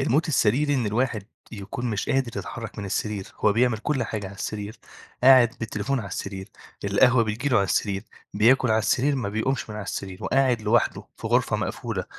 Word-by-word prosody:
الموت 150 +4 +1
السريري 145 +2 +2
إن 125 -5 0
الواحد 110 -1 0 0.3
يكون 110 +4 -5
مش 105 - -2
قادر 130 -3 0
يتحرك 115 -2 -7
من 105 - -4
السرير، 100 0 -3
هو 105 - +3
بيعمل 120 0 +2
كلّ 135 +3 -1
حاجة 110 -3 -4
على 95 - -9
السرير، 105 +1 -5 0.4
قاعد 125 -3 +7
بالتليفون 110 +4 -2
على 100 -5 -5
السرير، 95 +1 -6 0.4
القهوة 115 +5 +4
بتيجي 110 +6 -2
له 125 - +3
على 100 - +3
السرير، 100 +1 -1 0.3
بياكل 120 +5 +4
على 110 - +4
السرير، 130 +7 +1
ما 120 -6 -2
بيقومش 110 +3 -2
من 105 - -6
على 105 - -5
السرير، 95 +1 -6
وقاعد 130 -4 +2
لوحده 115 +2 +1
في - - -6
غرفة - - +2
مقفولة - - -3
110 Hz, 185 wpm, -25 LUFS, 105-130 Hz, 0.4 s, قاعد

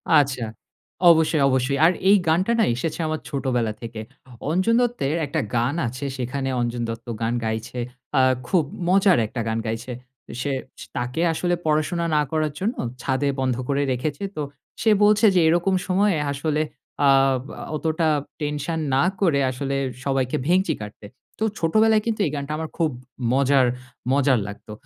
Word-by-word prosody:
আচ্ছা। 135 -5 +3 0.6
অবশ্যই, 160 -2 +4
অবশ্যই। 130 +1 +1
আর 170 - +6 0.2
এই 205 - +7
গানটা 185 +8 +2
না - - +5
এসেছে 150 +7 -3
আমার 155 0 -2
ছোটবেলা 125 -5 -1
থেকে। 115 -1 -7 0.5
অঞ্জন 185 +7 +2
দত্তের 230 - 0
একটা 145 - -1
গান 120 +5 +1
আছে 130 +4 -5
সেখানে 135 +2 -2
অঞ্জন 120 0 -2
দত্ত 115 +1 -6
গান 115 +1 0
গাইছে, 110 +3 -3 0.4
আ - - +6 0.3
খুব 180 -4 +3 0.2
মজার 190 -1 +5
একটা 120 - -4
গান 110 0 -1
গাইছে। 115 +3 -4 0.5
সে 140 +1 -1 0.3
স - - -6
তাকে 125 +6 -2
আসলে 175 +2 0
পড়াশোনা 155 +3 +1
না 150 - +4
করার 155 -2 0
জন্য 215 +6 -1 0.3
ছাদে 135 +1 0
বন্ধ 130 -2 +1
করে 140 0 +1
রেখেছে। 145 +7 -2
তো 150 - -3 0.4
সে 220 - +4
বলছে 210 +2 +5
যে 180 - +5
এরকম 175 +4 +2
সময়ে 190 -1 +2
আসলে 150 +2 -1 0.4
আ - - +6 0.7
অতটা 160 +1 0 0.3
টেনশন 150 +2 -2 0.2
না 135 - +4 0.2
করে 160 -7 +3
আসলে 135 +2 -3 0.3
সবাইকে 135 -2 0
ভেংচি 180 -1 +3
কাটতে। 105 0 -9 0.3
তো - - 0 0.2
ছোটবেলায় 215 +6 +3
কিন্তু 225 -2 -1
এই 150 - -1
গানটা 140 +1 -4
আমার 160 0 -4
খুব 165 -2 +2 0.4
মজার 135 -1 +4 0.5
মজার 135 -3 +3
লাগতো। 100 +1 -9
145 Hz, 155 wpm, -23 LUFS, 130-170 Hz, 0.7 s, এই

